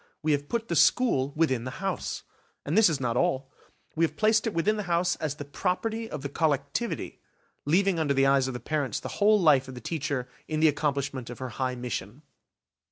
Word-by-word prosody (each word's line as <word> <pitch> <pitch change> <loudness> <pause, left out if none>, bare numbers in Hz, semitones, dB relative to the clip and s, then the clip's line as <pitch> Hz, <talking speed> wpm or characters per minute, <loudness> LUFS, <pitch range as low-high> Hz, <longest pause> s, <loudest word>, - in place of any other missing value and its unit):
We 155 - +2
have 145 0 -1
put 230 -1 -2
the 170 - -1
school 145 - +3
within 130 -7 +1
the 130 +2 -6
house; 195 -2 -3 0.4
and 150 - -1
this 220 -3 +6
is 150 -5 -1
not 120 -2 -1
all. 130 +2 0 0.4
We 165 - +1
have 165 - 0
placed 220 +1 +3
it 220 - -2
within 205 +6 +2
the - - -1
house 175 +1 +2
as 150 -3 -3
the 145 - -7
property 220 +9 -2
of 150 -2 -6
the - - -1
collectivity, 145 - -1 0.5
leaving 180 +3 +2
under 145 -3 +1
the 135 0 +4
eyes 135 -1 +3
of 130 - -4
the - - -4
parents 145 -7 -2
the - - -6
whole 210 +1 +6
life 145 -7 +4
of 130 - -8
the - - -7
teacher 140 -2 -3 0.2
in 155 -1 -2
the 160 - +5
accomplishment 140 -4 -2
of 120 - -7
her 130 -1 -5
high 130 +2 -2
mission. 120 +1 -5
145 Hz, 215 wpm, -27 LUFS, 130-175 Hz, 0.5 s, this